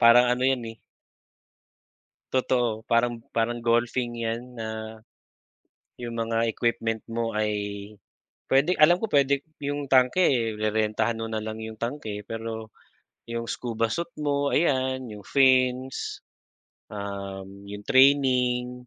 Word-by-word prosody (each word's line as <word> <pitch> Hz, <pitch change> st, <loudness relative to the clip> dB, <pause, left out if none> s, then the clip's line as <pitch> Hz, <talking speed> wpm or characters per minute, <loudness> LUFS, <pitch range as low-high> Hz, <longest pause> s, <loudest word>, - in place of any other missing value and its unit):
parang 115 Hz, +1 st, +8 dB
ano 125 Hz, -, -1 dB
yan, 130 Hz, -3 st, +1 dB
eh. 115 Hz, -, -18 dB, 1.6 s
Totoo 120 Hz, -4 st, +1 dB
parang 115 Hz, 0 st, +2 dB
parang 115 Hz, +1 st, -1 dB
golfing 120 Hz, +1 st, +1 dB, 0.2 s
yan 120 Hz, +1 st, -5 dB
na, 110 Hz, 0 st, -6 dB, 1.0 s
yung 120 Hz, -1 st, -5 dB
mga 115 Hz, 0 st, 0 dB
equipment 115 Hz, -1 st, -1 dB
mo 115 Hz, 0 st, -2 dB
ay 105 Hz, 0 st, +1 dB, 1.0 s
pwede 150 Hz, +7 st, +3 dB
alam 175 Hz, +4 st, +6 dB
ko 225 Hz, -, -2 dB
pwede 140 Hz, -1 st, +3 dB, 0.2 s
yung 145 Hz, -1 st, -4 dB
tanke, 130 Hz, +7 st, +4 dB
eh, 115 Hz, -9 st, +2 dB
rerentahan 110 Hz, +1 st, 0 dB
mo 115 Hz, -, -3 dB
na 110 Hz, -1 st, -3 dB
lang 110 Hz, 0 st, -5 dB
yung 110 Hz, 0 st, -6 dB
tanke. 115 Hz, -4 st, -4 dB
Pero 110 Hz, 0 st, -6 dB, 0.6 s
yung 115 Hz, 0 st, -3 dB
scuba 115 Hz, -2 st, -1 dB
suit 170 Hz, 0 st, -2 dB, 0.2 s
mo 140 Hz, 0 st, +1 dB
ayan 130 Hz, -4 st, +1 dB
yung 105 Hz, -2 st, -10 dB
fins, 130 Hz, -1 st, +2 dB, 0.7 s
um, 100 Hz, -1 st, -7 dB
yung 105 Hz, +1 st, -7 dB
training, 125 Hz, -2 st, +3 dB
115 Hz, 125 wpm, -26 LUFS, 110-130 Hz, 1.6 s, parang